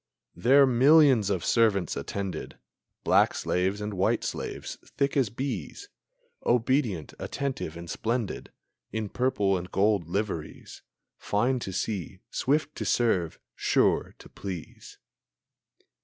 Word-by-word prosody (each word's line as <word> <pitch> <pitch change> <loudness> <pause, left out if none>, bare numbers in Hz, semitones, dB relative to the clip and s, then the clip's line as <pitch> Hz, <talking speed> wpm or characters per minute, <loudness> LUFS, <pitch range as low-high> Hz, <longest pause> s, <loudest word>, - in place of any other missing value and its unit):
There 135 +9 +5
millions 130 -3 +5
of 95 -4 -1
servants 110 -6 +2
attended, 100 -2 -5 0.5
Black - - +4
slaves 95 +3 0
and 105 0 -3
white 95 0 +1
slaves, - - -5
thick 140 0 -2
as 135 -6 +2
bees, 135 - -5 0.5
Obedient, 120 - +1
attentive, 130 - -4
and 85 0 -8
splendid 115 +5 -3 0.4
In 110 -2 -3
purple 105 -6 +1
and 90 0 -4
gold 100 -4 +2
liveries, 95 -4 -4 0.4
Fine 125 +5 +1
to 95 - -5
see, 95 -1 -3
swift 150 +3 0
to - - -3
serve, 95 -9 +1 0.2
sure - - +1
to - - -14
please! 90 -5 -8
105 Hz, 115 wpm, -27 LUFS, 95-130 Hz, 0.5 s, There